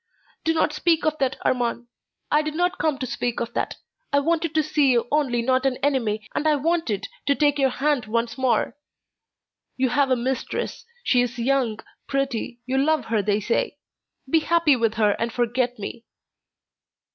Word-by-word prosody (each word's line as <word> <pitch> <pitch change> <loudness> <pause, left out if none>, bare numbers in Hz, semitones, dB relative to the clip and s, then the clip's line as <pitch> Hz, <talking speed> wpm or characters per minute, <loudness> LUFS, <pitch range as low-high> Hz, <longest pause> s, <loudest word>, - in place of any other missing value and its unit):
"Do 325 0 +1
not 315 - +2
speak 330 +1 +1
of 310 0 0
that, 265 -1 0
Armand; 240 -1 0 0.5
I 300 - +4
did 305 0 -4
not 355 +2 0
come 310 -3 +1
to 265 - -3
speak 240 0 -2
of 235 - -4
that. - - -2 0.4
I 285 - +3
wanted 325 +1 0
to 310 - +4
see 295 -2 +2
you 240 -1 +2
only 265 -6 +1
not 260 +1 +2
an 265 -2 +1
enemy, 225 -7 0
and 310 - 0
I 305 - +4
wanted 315 - 0 0.2
to 280 - +4
take 290 -1 +2
your 270 -1 +4
hand 270 -2 0
once 230 +1 -1
more. 260 -2 +1 1.0
You 260 0 +2
have 275 +2 +2
a 255 - +4
mistress; 255 - -3 0.2
she 245 - +3
is 245 0 -2
young, 240 -3 0 0.3
pretty, 265 -3 -2
you 260 +1 0
love 300 -2 +2
her 220 -2 +1
they 205 +1 +1
say. 230 - -1 0.5
Be 320 +5 +4
happy 330 -2 +3
with 225 -3 0
her 215 -1 +3
and 230 0 -1
forget 245 +1 0
me." 220 +3 -7
265 Hz, 180 wpm, -24 LUFS, 235-300 Hz, 1.0 s, I